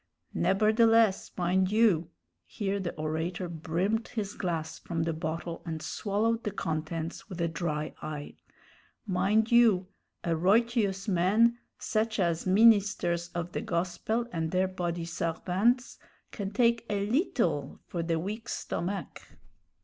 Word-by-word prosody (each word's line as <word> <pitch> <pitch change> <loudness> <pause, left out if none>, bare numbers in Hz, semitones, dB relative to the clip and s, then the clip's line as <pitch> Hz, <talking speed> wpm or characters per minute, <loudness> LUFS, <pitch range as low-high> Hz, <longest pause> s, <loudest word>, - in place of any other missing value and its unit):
"Neberdeless, 220 +1 +3
mind 185 +1 +2
you 205 -7 +3 0.2
" - - -52
here 200 -2 -2
the 180 -3 -4
orator 160 +4 -2
brimmed 175 +7 -1
his 210 -4 -4
glass 165 -4 -3
from 165 -2 -2
the 165 0 -1
bottle 165 +1 -4
and 160 -1 -4
swallowed 220 +7 -1
the - - -1
contents 165 -1 -4
with 180 -3 -7
a 170 - +1
dry 155 -2 -3
eye 150 -1 -6 0.7
"mind 210 +4 +2
you, 225 -6 +5 0.4
a 170 - -1
roytious 200 +2 +2
man, 210 +6 +3 0.2
sech 220 0 -1
as 170 -3 0
ministers 200 -4 +4
of 175 0 -3
de - - -3
gospel 185 +7 -1
and 165 -1 -1
dere 185 +2 +2
body 175 -2 -3
sarvants, 185 +9 0 0.3
can 200 -3 -4
take 235 +1 +2
a 200 -1 0
leetle 210 - 0
for 170 - -3
de 165 0 0
weak 210 +7 -5
stomach." 195 +3 -4
185 Hz, 135 wpm, -29 LUFS, 170-215 Hz, 0.7 s, you